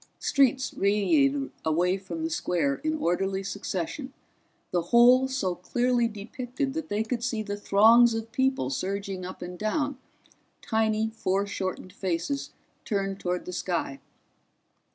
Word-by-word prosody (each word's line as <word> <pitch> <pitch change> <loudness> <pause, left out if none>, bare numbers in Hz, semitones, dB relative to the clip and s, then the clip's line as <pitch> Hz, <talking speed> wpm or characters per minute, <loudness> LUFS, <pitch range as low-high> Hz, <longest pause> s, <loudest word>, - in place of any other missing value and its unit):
Streets 260 -1 +2
radiated 275 +8 +2
away 175 +4 +2
from 170 -4 -6
the 160 - -2
square 160 -4 0
in 315 0 -2
orderly 195 - 0
succession, 200 - -4 0.6
the 175 - +1
whole 240 +8 +6
so 260 -9 -1
clearly 240 +6 +1
depicted 245 +5 -4
that 320 0 -4
they 205 +1 0
could 235 +1 -3
see 230 -3 -1
the 205 -1 -4
throngs 225 +4 +5
of 225 0 -5
people 260 - +1
surging 195 +4 -3
up 185 - -8
and 180 0 -7
down, 280 +5 -1 0.6
tiny 220 0 0
foreshortened 190 -3 -2
faces 190 +8 -2 0.3
turned 195 -2 -2
toward 180 0 -2
the 180 - -6
sky. 170 -7 -2
205 Hz, 130 wpm, -27 LUFS, 185-245 Hz, 0.6 s, whole